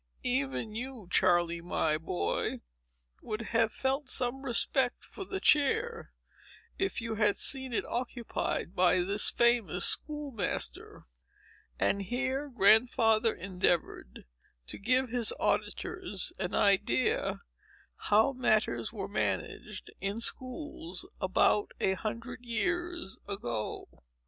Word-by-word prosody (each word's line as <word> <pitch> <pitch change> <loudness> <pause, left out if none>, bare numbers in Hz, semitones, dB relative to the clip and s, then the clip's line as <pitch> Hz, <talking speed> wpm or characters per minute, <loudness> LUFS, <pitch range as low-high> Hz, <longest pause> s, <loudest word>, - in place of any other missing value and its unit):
Even 135 - -1
you, 240 -3 -6
Charley, 175 -2 +3
my 160 -3 0
boy, 90 - -2 0.6
would 215 +1 -4
have 225 -1 +3
felt 270 +1 -2
some 250 +2 0
respect 260 0 +1
for 390 - -8
the 385 +1 -4
chair, 420 - +2 0.7
if 385 -6 -1
you 230 -1 -3
had 210 -1 +3
seen 265 -2 +3
it 230 - -1
occupied 240 -6 -3
by 180 0 +4
this 200 +3 +3
famous 235 -7 +2
school 295 -2 0
master." 205 -7 -3 0.7
And 200 - +1
here 265 +7 -2
Grandfather 225 0 +4
endeavored 180 - -2 0.4
to - - -6
give 255 +5 +1
his 235 -1 +2
auditors - - -1
an - - -2
idea 195 -11 +2 0.7
how 220 +6 +4
matters 220 -4 +1
were - - -5
managed 425 - -3
in 200 +2 -2
schools 245 - -1
above 190 +2 +3
a 190 - +2
hundred 230 +5 -5
years 345 - -2
ago. 120 - -4
225 Hz, 110 wpm, -30 LUFS, 190-260 Hz, 0.7 s, by